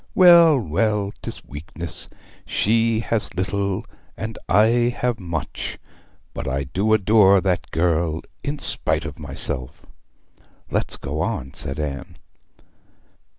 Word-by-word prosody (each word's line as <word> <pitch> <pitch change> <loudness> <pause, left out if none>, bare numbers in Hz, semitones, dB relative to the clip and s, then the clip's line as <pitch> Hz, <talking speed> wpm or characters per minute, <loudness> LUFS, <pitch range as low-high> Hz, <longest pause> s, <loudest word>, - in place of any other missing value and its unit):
Well, 170 -4 +8
well, 105 +2 0
'tis - - -6
weakness! 80 +3 -4 0.3
She 115 +1 +1
has 115 -5 -2
little, 100 +2 -1 0.3
and 110 0 -5
I 120 +3 +4
have 125 -2 -1
much; 85 -4 -4 0.6
but - - -5
I 70 +2 -1
do 95 +11 0
adore 100 -2 +5
that 90 -1 -1
girl, 80 -1 0 0.2
in 145 +1 -2
spite 80 - 0
of 75 -2 -7
myself!' 70 -3 -4 0.9
'Let's - - 0
go 75 +3 -4
on,' 65 -3 -3
said 70 +3 -4
Anne. 75 +3 -5
95 Hz, 115 wpm, -22 LUFS, 80-110 Hz, 0.9 s, Well